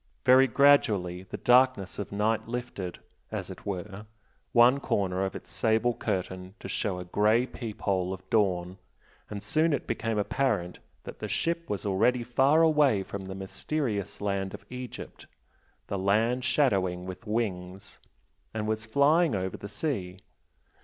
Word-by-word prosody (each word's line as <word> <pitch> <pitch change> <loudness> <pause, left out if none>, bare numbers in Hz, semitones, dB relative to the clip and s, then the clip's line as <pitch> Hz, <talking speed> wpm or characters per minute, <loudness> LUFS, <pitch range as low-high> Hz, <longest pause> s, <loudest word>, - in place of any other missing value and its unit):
Very 130 +1 +7
gradually 110 -10 +3
the - - -5
darkness 125 -6 +3
of 100 - -5
night 105 +3 0
lifted, 115 -7 -5 0.3
as - - -4
it - - -11
were, 100 +2 -5 0.4
one 120 +3 +6
corner 95 -7 0
of 95 - -3
its - - -9
sable 115 +2 +2
curtain 95 -3 -4
to - - -7
show 100 -5 -2
a 90 - -6
grey 105 +6 +3
peep 115 -4 -8
hole 95 -2 0
of 95 0 -7
dawn, 95 -3 +1 0.5
and 100 -1 -6
soon 155 +9 +2
it 140 - -2
became 115 -1 -2
apparent 105 -5 0 0.2
that - - -9
the - - -4
ship 170 0 -1
was 105 -1 -3
already 120 +5 +2
far 135 +7 +4
away 150 -10 +4
from 95 0 -7
the 95 0 -6
mysterious 100 +2 -3
land 100 -1 -2
of - - -14
Egypt 125 -1 -8 0.6
"The 100 - -3
land 110 +6 +2
shadowing 100 -9 +1
with 95 +1 -8
wings" 95 -4 -3 0.6
and 105 -1 -2
was 110 0 -2
flying 145 +3 +3
over 95 -1 -2
the 100 - -8
sea. 100 - -3
105 Hz, 155 wpm, -28 LUFS, 95-125 Hz, 0.6 s, Very